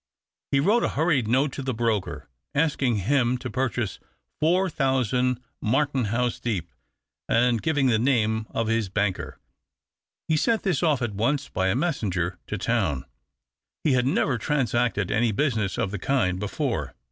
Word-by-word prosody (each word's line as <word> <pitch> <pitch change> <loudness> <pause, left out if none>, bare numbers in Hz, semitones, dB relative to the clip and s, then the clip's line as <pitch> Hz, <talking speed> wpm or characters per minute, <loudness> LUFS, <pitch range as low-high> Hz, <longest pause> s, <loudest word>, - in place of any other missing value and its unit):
He 140 - +3
wrote 210 +11 +3
a - - +1
hurried 150 -7 +2
note 135 +5 +2
to 140 - -5
the 130 -2 -2
broker, 110 -4 -1 0.3
asking 140 -5 +2
him 125 -1 +2
to 130 -1 -6
purchase 120 -4 -2 0.4
four 180 +5 +3
thousand 125 - +1 0.2
Martenhuis 125 -2 0
Deep, 95 -9 -2 0.6
and 120 -1 +3
giving 145 -4 +1
the 115 -4 +3
name 110 -3 +1
of 115 - -1
his 115 -3 0
banker. 100 -1 -2 0.9
He 160 - +2
sent 220 +8 +1
this 180 -8 +1
off 150 -7 +2
at 115 -3 -2
once 135 +7 0
by 95 0 0
a 95 - +1
messenger 105 - -1
to - - -3
town. 70 -2 0 0.8
He 150 - +3
had 125 0 +2
never 135 -2 +1
transacted 120 -6 0
any 110 +2 +2
business 110 -4 0
of 95 - -1
the 100 - -4
kind 95 -8 +1
before. 100 -1 -2
125 Hz, 155 wpm, -25 LUFS, 110-140 Hz, 0.9 s, He